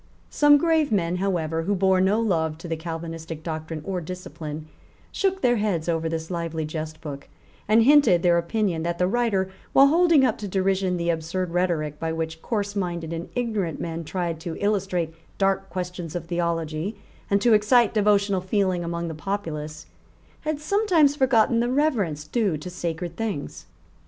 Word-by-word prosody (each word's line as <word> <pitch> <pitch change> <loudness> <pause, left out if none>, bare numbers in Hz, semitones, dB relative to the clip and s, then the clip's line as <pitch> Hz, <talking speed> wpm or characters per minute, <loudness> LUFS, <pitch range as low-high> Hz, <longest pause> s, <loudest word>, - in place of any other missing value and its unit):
Some 295 0 +6
grave 320 -2 +2
men, 180 -4 +1
however, 165 -4 -1
who 200 +5 0
bore 190 0 +3
no 195 +4 +3
love 160 -8 0
to 165 - -9
the 165 - -1
Calvinistic 165 -1 -6
doctrine 160 -1 -5
or 185 -2 -2
discipline, 155 -3 -7 0.4
shook 385 -1 0
their 245 -1 +3
heads 195 -7 -1
over 165 -1 0
this 160 +1 -4
lively 165 -2 -3
jest 155 0 -6
book, 145 -3 -8 0.4
and 220 +2 +5
hinted 240 - +5
their 175 -1 +4
opinion 175 -1 -1
that 170 +1 -2
the 180 - +2
writer, 195 -3 0 0.2
while 275 - +8
holding 330 -3 +5
up 225 - 0
to 210 - -4
derision 190 -1 0
the 170 0 +1
absurd 170 +2 -3
rhetoric 165 -4 -1
by 165 0 -2
which 160 0 -4
coarseminded 195 -7 -2
and 165 +1 -5
ignorant 215 -9 -1
men 165 0 -4
tried 170 0 -3
to 165 0 -5
illustrate 190 -5 0 0.2
dark 195 0 +1
questions 180 -3 -5
of 175 -1 -3
theology 170 +3 -2 0.3
and 200 - +3
to 235 - +5
excite 215 +2 +4
devotional 200 -2 +2
feeling 185 -2 0
among 170 0 -3
the 165 - -4
populace, 155 -4 -4 0.5
had 310 -2 -3
sometimes 325 -4 +3
forgotten 240 -4 +3
the 240 +1 +1
reverence 235 - 0
due 200 -2 0
to 180 +5 -8
sacred 170 -1 -4
things. 210 -11 -4
180 Hz, 165 wpm, -24 LUFS, 165-210 Hz, 0.5 s, while